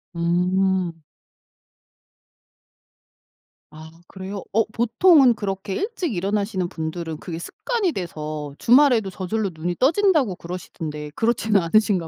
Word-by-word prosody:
음. 180 +1 +1 2.8
아. 155 +1 -12 0.2
그래요? 190 +1 -7
어 225 +2 +4
보통은 250 +4 +5
그렇게 195 -2 -4
일찍 390 - -2
일어나시는 195 0 -1
분들은 160 0 -5
그게 165 +1 -7
습관이 415 - -2
돼서 155 - -5
주말에도 245 -5 +4
저절로 195 +3 -2
눈이 170 +2 -3
떠진다고 305 - +3
그러시던데 160 -4 -7
그렇지는 225 -2 +2
않으신가 185 0 +2
190 Hz, 275 characters per minute, -22 LUFS, 170-230 Hz, 2.8 s, 보통은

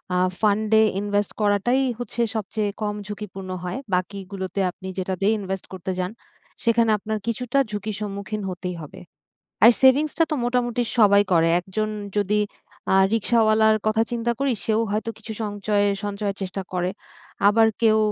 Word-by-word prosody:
আ - - +2 0.2
ফান্ডে 215 +1 +3 0.2
ইনভেস্ট 205 -1 0
করাটাই 210 +6 +2 0.2
হচ্ছে 240 0 -3
সবচেয়ে 215 0 -2
কম 210 -1 -1
ঝুঁকিপূর্ণ 195 -2 -7
হয়, 180 +7 -3 0.2
বাকিগুলোতে 190 0 -3
আপনি 190 - -11
যেটাতেই 190 +3 0
ইনভেস্ট 190 -1 -4
করতে 190 0 -4
যান 180 +2 -1 0.5
সেখানে 230 -1 +3
আপনার 215 +2 -3
কিছুটা 245 +3 -1
ঝুঁকির 210 0 -4
সম্মুখীন 205 +1 -4
হতেই 180 0 -5
হবে। 150 - -10 0.7
আর 230 - +11
সেভিংসটা 295 +5 +4
তো - - +1
মোটামুটি 245 -1 0 0.2
সবাই 205 -2 +6
করে 165 -1 +4
একজন 205 +4 -3 0.3
যদি 210 +1 +1 0.5
আ - - +5 0.2
রিক্শাওয়ালার 220 -1 +4
কথা 220 +1 +3
চিন্তা 235 0 0
করি 275 -2 +2
সেও 220 0 +2
হয়তো 215 +2 -1
কিছু 220 0 -7
সঞ্চয়- 205 0 0 0.2
সঞ্চয়ের 200 -1 -3
চেষ্টা 190 +1 -4
করে। 180 0 0 0.6
আবার 220 +2 +5
কেউ 220 -1 +5
210 Hz, 145 wpm, -23 LUFS, 195-225 Hz, 0.7 s, আর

